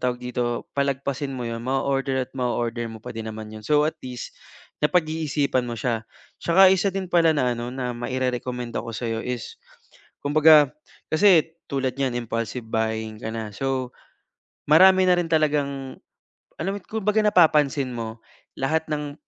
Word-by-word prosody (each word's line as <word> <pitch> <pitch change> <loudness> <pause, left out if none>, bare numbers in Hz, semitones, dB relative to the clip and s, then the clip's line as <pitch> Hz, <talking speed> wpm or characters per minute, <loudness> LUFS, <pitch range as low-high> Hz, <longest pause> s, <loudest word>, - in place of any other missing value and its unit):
tawag 125 -1 0
dito, 120 -1 -2
palagpasin 140 0 -2
mo 125 - -4
'yon, 115 0 -4
mao-order 135 +1 0
at 130 - -28
mao-order 120 -2 -2
mo 110 -1 -10
pa - - -6
din 115 -1 -6
naman 110 0 -7
yun, 110 - -8
so 150 0 +4
at 155 +1 -1
least 125 -1 -7 0.5
napag-iisipan 155 -5 +1
mo 120 - -4
siya. 115 -3 -1 0.4
Tsaka 190 +3 +6
isa 190 +1 +2
din 190 0 -3
pala 170 -2 +4
na 125 -3 +2
ano, 120 +1 -5
na 125 -1 -3
mairerekomenda 125 -1 -3
ko 115 - -7
sa'yo 115 -2 -2
is 125 - -5 0.7
kumbaga 150 -1 +6 0.4
kasi 165 -2 +4 0.2
tulad 135 -2 -1
niyan 130 -3 -1
impulsive 115 +1 -3
buying 110 -1 -2
ka - - -5
na, 110 -2 -5
so 130 +2 -2 0.8
marami 185 +4 +7
na 180 - +5
rin 175 - 0
talagang 145 -4 0 0.6
alam 195 - -1
mo - - -4
at - - -28
kung 220 -2 -3
baga 215 +1 +3
napapansin 150 -8 +3
mo 115 -1 -5 0.4
lahat 160 +4 0
ng 150 -1 -3
130 Hz, 160 wpm, -24 LUFS, 120-155 Hz, 0.8 s, marami